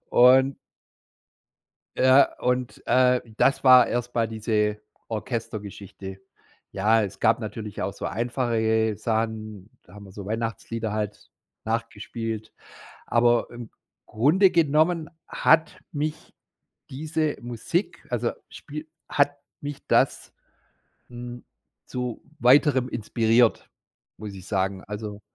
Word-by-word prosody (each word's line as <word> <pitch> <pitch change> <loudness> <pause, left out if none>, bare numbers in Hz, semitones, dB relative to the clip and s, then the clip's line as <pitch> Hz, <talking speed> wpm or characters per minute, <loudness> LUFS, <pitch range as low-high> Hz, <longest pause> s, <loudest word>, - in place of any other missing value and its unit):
Und 130 +2 +6 1.4
Ja, 130 +2 +5
und, 125 0 -1
äh, 125 -1 +4 0.2
das 135 - +2
war 125 -2 +8
erst 120 +1 -3
mal 115 -1 +1
diese 105 -1 -1 0.3
Orchestergeschichte. 105 -4 -6 0.5
Ja, 110 +3 +3
es 100 -1 -5
gab 115 +2 +3
natürlich 105 -1 -6
auch - - -2
so - - -8
einfache 120 +1 -1
ge 110 -1 +2
Sachen, 110 -2 -3
da 90 - -19
haben 100 0 -11
wir 95 - -13
so 100 0 -8
Weihnachtslieder 115 0 -3
halt 105 -1 -4 0.3
nachgespielt. 115 0 -4 0.6
Aber 120 0 +3
im 120 -2 -9 0.4
Grunde 160 - +3
genommen 160 0 +2 0.2
hat 160 0 +2
mich 150 +1 -4 0.6
diese 155 +2 -2
Musik 120 - -3
also 120 -1 0 0.2
spiel 150 +2 -9 0.2
hat 145 0 +2 0.2
mich 145 -1 -7
das, - - +1 0.8
hm, 120 0 -9 0.4
zu 125 -2 -4 0.2
weiterem 130 0 +5
inspiriert, 115 0 +2 0.5
muss 105 -1 -7
ich 95 -1 -11
sagen. 95 -1 -1
Also, 105 0 -7
115 Hz, 110 wpm, -25 LUFS, 110-130 Hz, 1.4 s, war